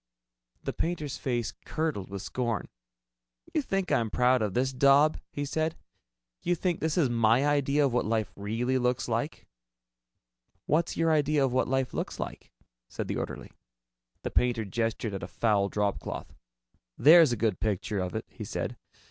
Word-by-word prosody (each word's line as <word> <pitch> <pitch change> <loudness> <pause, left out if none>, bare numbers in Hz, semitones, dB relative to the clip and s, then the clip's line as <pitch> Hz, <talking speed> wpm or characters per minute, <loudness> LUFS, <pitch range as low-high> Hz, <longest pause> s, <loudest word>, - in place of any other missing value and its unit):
The - - -3
painter's 160 -5 -3
face 120 -3 -1
curdled 155 - -2
with 100 0 -6
scorn. 120 -1 -2 0.8
"You 310 - +2
think 195 -8 -2
I'm 115 -2 +2
proud 125 +3 +3
of 105 -3 -1
this 130 +2 +1
daub?" 140 +4 +5
he 145 - -3
said. 160 +3 -1 0.6
"You 175 - +1
think 175 0 -1
this 160 +1 -1
is 160 -6 +4
my 115 +2 +3
idea 145 0 +2
of 130 - 0
what 120 - +1
life 110 -4 0
really 115 +6 -1
looks 125 +1 0
like?" 120 +6 -2 1.2
"What's 165 +2 +1
your 165 0 +3
idea 150 -2 +3
of 125 - -1
what 130 - +2
life 135 0 0
looks - - -4
like?" - - -6 0.4
said - - -5
the - - -1
orderly. - - -5 0.7
The - - -3
painter 120 -3 +1
gestured 115 +1 -2
at 95 - -4
a - - -5
foul 105 -3 +1
dropcloth. 105 -1 -3 0.6
"There's 160 -1 +8
a 120 - 0
good 105 -3 0
picture 105 0 -1
of 90 -2 -3
it," - - -3
he - - -9
said. - - -4
125 Hz, 165 wpm, -29 LUFS, 110-150 Hz, 1.2 s, There's